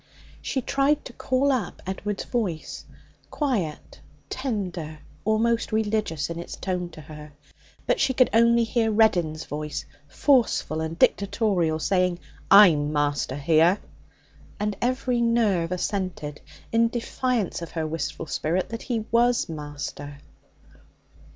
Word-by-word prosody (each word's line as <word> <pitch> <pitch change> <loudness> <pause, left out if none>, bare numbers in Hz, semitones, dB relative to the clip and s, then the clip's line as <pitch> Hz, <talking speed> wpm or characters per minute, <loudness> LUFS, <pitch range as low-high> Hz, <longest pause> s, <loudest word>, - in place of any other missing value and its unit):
She 265 -3 -2
tried 275 +4 +1
to 260 - -9
call 260 +3 +1
up 255 -5 -2
Edward's 195 +2 -3
voice 195 -10 -3 0.4
quiet, 215 - -2 0.3
tender, 185 - -3 0.3
almost 225 +2 +1
religious 210 -8 0
in 170 0 -5
its 170 - -7
tone 180 -2 -3
to 155 - -10
her. 150 0 -11 0.5
But - - +1
she 270 - +3
could 255 - +4
only 235 +1 +5
hear 225 0 +1
Reddin's 175 -8 +2
voice, 150 0 -5 0.2
forceful 230 - +2
and 160 +1 -4
dictatorial, 195 -5 +2
saying, 180 +1 +1 0.3
'I'm 165 -8 +7
master 145 -3 0
here!' 160 +6 +4 0.8
And 210 -1 -1
every 250 0 0
nerve 215 -8 +2
assented, 180 -5 -3 0.3
in 230 0 +4
defiance 240 -4 -2
of 170 - -8
her 160 -2 -2
wistful 165 +1 -4
spirit, 165 +4 -1
that 230 0 -5
he 230 -4 -2
was 240 +1 +3
master. 145 -2 -6
195 Hz, 125 wpm, -25 LUFS, 160-235 Hz, 0.8 s, I'm